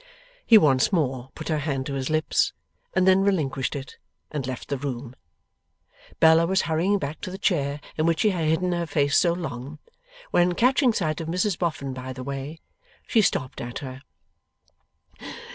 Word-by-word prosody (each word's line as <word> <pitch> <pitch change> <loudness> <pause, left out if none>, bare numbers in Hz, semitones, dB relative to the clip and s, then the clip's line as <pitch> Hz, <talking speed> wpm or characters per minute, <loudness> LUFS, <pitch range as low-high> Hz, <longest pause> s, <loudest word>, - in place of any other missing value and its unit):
He 225 - +9
once 140 -5 +4
more 135 -8 -1
put - - -7
her 155 -1 +1
hand 140 -3 -2
to 140 - -4
his 135 -1 -2
lips, 155 0 +1 0.4
and 185 0 +3
then 190 0 +6
relinquished 150 -10 0
it, 135 -2 -7 0.3
and 145 -4 -3
left 130 -2 -6
the 140 - -1
room. 130 -2 -5 1.0
Bella 160 +1 +6
was 190 +1 +2
hurrying 170 +5 +1
back 150 -3 -5
to - - -5
the 190 - -6
chair 145 -7 0 0.2
in 155 +1 +1
which 165 -1 +1
she 215 - +4
had 170 -4 -1
hidden 180 +3 +1
her 170 -1 -1
face 145 -2 +1
so 175 - +4
long, 150 -4 -5 0.5
when, 175 0 +3
catching 255 +3 +3
sight 165 -7 -1
of 160 - -5
Mrs 180 +3 0
Boffin 145 -6 -2
by 130 0 -6
the 130 0 -7
way, 140 +3 -5 0.5
she 225 - +3
stopped 130 -9 -1
at 120 0 -5
her. 130 0 -8
155 Hz, 180 wpm, -25 LUFS, 135-180 Hz, 1.0 s, He